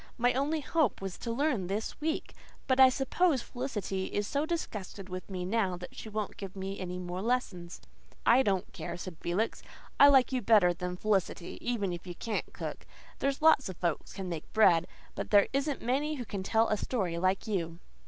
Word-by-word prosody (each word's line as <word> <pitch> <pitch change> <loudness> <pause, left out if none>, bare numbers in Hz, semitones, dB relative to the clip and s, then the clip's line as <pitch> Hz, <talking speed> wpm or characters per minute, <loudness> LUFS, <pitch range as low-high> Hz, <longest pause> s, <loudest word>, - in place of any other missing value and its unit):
My 245 +1 +3
only 290 +4 0
hope 290 - +1
was 195 -2 -5
to 235 - -3
learn 245 - 0
this 210 +9 -3
week. 315 +1 -2 0.3
But 260 0 +1
I 260 -1 +10
suppose 270 +2 +1
Felicity 210 -7 -3
is 205 - -1
so 285 +7 -1
disgusted 210 - -4
with 185 +1 -6
me 180 -2 -4
now 190 -2 0
that 180 - -9
she 220 - -7
won't 215 -1 -4
give 195 -1 -7
me 195 +1 -5
any 180 -1 -4
more 180 0 -4
lessons." 200 -7 -2 0.5
"I 250 +3 +6
don't 195 -6 0
care," 170 0 -5
said 175 -2 -7
Felix. 190 +6 -1 0.4
"I 280 - +10
like 265 -3 +5
you 255 -1 0
better 205 -5 +5
than 180 +1 -4
Felicity, 195 -4 -1
even 205 -7 -1
if 175 +1 -8
you 175 - -6
can't 225 +2 -3
cook. - - -6 0.3
There's 275 +2 -1
lots 315 -8 +5
of 185 - -7
folks 170 -4 -2
can 190 -1 -5
make 165 -3 -6
bread. 180 -6 +5 0.3
But - - -5
there 205 -1 +6
isn't 275 +1 -1
many 285 +5 0
who 250 -4 -5
can 200 -3 -4
tell 220 +4 +2
a 215 - +2
story 190 -8 -1
like 185 +2 +1
you." 170 -6 -2
210 Hz, 200 wpm, -31 LUFS, 185-255 Hz, 0.5 s, I